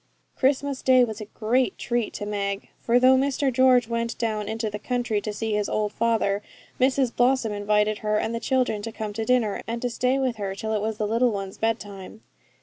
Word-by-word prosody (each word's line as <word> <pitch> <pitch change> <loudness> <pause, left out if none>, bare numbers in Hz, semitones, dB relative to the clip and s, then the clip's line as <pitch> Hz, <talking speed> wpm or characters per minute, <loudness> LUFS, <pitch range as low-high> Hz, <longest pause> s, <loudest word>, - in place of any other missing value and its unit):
Christmas 275 0 +1
Day 255 -1 +5
was 220 -2 -3
a - - -5
great 225 +2 0
treat 240 -2 -1
to 205 - -5
Meg; 200 -1 -3
for 240 +1 +2
though 255 +1 +6
Mr 270 0 +1
George 250 -2 +4
went 230 0 -2
down 215 -2 -2
into 220 0 -2
the 210 0 -5
country 245 -2 -1
to 215 - -4
see 220 +1 -3
his 210 -1 0
old 210 -1 -1
father, 225 -3 +1 0.4
Mrs 260 -1 +2
Blossom 245 -2 +2
invited 210 +1 +1
her 210 0 0
and 220 +2 -1
the 230 - -2
children 255 -5 0
to 225 +2 -5
come 215 -1 -5
to 225 +1 -3
dinner, 245 -4 +1
and 230 +1 -3
to 245 - -1
stay 255 +3 +1
with 260 -4 -1
her 195 -2 -3
till 220 +1 -3
it 210 - 0
was 220 0 -2
the 215 - -1
little 230 +4 +2
ones' 195 -2 -5
bedtime. 220 -2 -3
225 Hz, 215 wpm, -25 LUFS, 210-250 Hz, 0.4 s, though